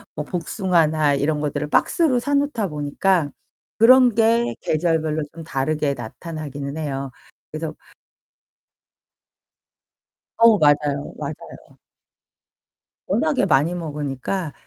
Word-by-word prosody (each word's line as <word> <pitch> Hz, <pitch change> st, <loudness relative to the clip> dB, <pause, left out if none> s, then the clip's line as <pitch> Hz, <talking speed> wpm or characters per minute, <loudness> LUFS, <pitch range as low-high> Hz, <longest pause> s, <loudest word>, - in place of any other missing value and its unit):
뭐 150 Hz, -, -4 dB
복숭아나 165 Hz, -4 st, +1 dB
이런 150 Hz, +2 st, 0 dB
것들을 150 Hz, 0 st, -2 dB
박스로 280 Hz, -, +2 dB
사 285 Hz, +4 st, -3 dB
놓다 280 Hz, -8 st, 0 dB
보니까 150 Hz, +2 st, 0 dB, 0.5 s
그런 250 Hz, 0 st, +7 dB
게 230 Hz, +2 st, +2 dB
계절별로 160 Hz, -1 st, 0 dB
좀 165 Hz, -1 st, -9 dB
다르게 145 Hz, 0 st, -1 dB
나타나기는 145 Hz, +1 st, -7 dB
해요. 140 Hz, -3 st, -4 dB, 0.4 s
그래서 155 Hz, 0 st, -5 dB, 2.6 s
어, 230 Hz, -2 st, +6 dB
맞아요. 145 Hz, -2 st, +1 dB
맞아요. 150 Hz, 0 st, -9 dB, 1.3 s
워낙에 -, -, +1 dB
많이 145 Hz, +6 st, +2 dB
먹으니까 150 Hz, +1 st, -4 dB
155 Hz, 230 characters per minute, -21 LUFS, 145-190 Hz, 2.6 s, 그런